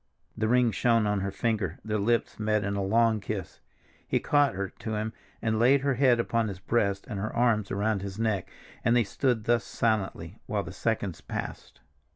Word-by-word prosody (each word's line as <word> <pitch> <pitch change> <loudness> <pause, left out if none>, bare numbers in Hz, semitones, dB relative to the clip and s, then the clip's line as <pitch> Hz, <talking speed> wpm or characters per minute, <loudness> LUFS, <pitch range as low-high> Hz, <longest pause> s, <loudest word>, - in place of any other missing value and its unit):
The 110 - 0
ring 125 0 +4
shone 115 +1 +2
on 105 -1 +1
her 100 +1 -2
finger, 100 -4 -1
their 105 -1 -1
lips 115 +3 0
met 105 -1 +1
in 100 0 -1
a 100 - -1
long 110 +3 +3
kiss. - - -5 0.5
He - - +1
caught 145 -6 +2
her 100 0 -2
to 110 -1 -5
him 110 +1 -2 0.3
and 110 -1 +1
laid 130 +4 +5
her 140 0 +1
head 125 -2 +4
upon 115 -1 +1
his 100 -3 -5
breast 100 0 0
and 105 -4 -4
her 110 +2 -2
arms 115 -4 +2
around 100 0 0
his 100 0 -6
neck, 110 -4 -1 0.3
and 120 - +3
they 120 - +5
stood 120 +2 0
thus, 120 +1 +2
silently, 110 -4 -1
while - - -1
the - - -8
seconds - - -2
passed. - - -6
110 Hz, 195 wpm, -28 LUFS, 100-120 Hz, 0.5 s, laid